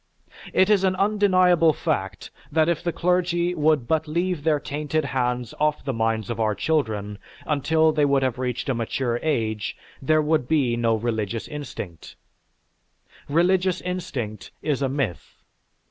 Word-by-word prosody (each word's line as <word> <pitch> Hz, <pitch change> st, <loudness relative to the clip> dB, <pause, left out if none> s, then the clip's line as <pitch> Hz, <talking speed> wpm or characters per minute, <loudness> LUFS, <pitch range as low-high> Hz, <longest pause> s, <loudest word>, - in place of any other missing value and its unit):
It 190 Hz, +3 st, +3 dB
is 200 Hz, -2 st, +4 dB
an 185 Hz, -1 st, +2 dB
undeniable 185 Hz, -5 st, +4 dB
fact 100 Hz, -, -3 dB, 0.2 s
that 160 Hz, +1 st, +3 dB
if 170 Hz, 0 st, 0 dB
the 175 Hz, -, 0 dB
clergy 175 Hz, 0 st, +1 dB
would 155 Hz, -6 st, +2 dB
but 160 Hz, -1 st, +1 dB
leave 170 Hz, 0 st, -1 dB
their 155 Hz, -2 st, +2 dB
tainted 150 Hz, +1 st, -2 dB
hands 125 Hz, -3 st, -1 dB
off 150 Hz, 0 st, 0 dB
the 135 Hz, -, -1 dB
minds 115 Hz, 0 st, -1 dB
of 115 Hz, -, -4 dB
our 110 Hz, -2 st, +1 dB
children 105 Hz, -7 st, -1 dB, 0.3 s
until 155 Hz, +2 st, +2 dB
they 150 Hz, -1 st, +1 dB
would 140 Hz, -1 st, +3 dB
have 130 Hz, -1 st, -1 dB
reached 125 Hz, -1 st, -2 dB
a 135 Hz, -, +1 dB
mature 120 Hz, +1 st, -1 dB
age, 110 Hz, -9 st, -1 dB, 0.2 s
there 155 Hz, +3 st, +3 dB
would 150 Hz, -4 st, +1 dB
be 135 Hz, -6 st, +2 dB
no 115 Hz, -1 st, +2 dB
religious 110 Hz, -1 st, -2 dB
instinct. 125 Hz, -, -8 dB, 1.1 s
Religious 180 Hz, +3 st, +2 dB
instinct 120 Hz, -, -5 dB
is 145 Hz, -3 st, 0 dB
a 135 Hz, -, +1 dB
myth. 130 Hz, -, -4 dB
145 Hz, 150 wpm, -24 LUFS, 120-165 Hz, 1.1 s, is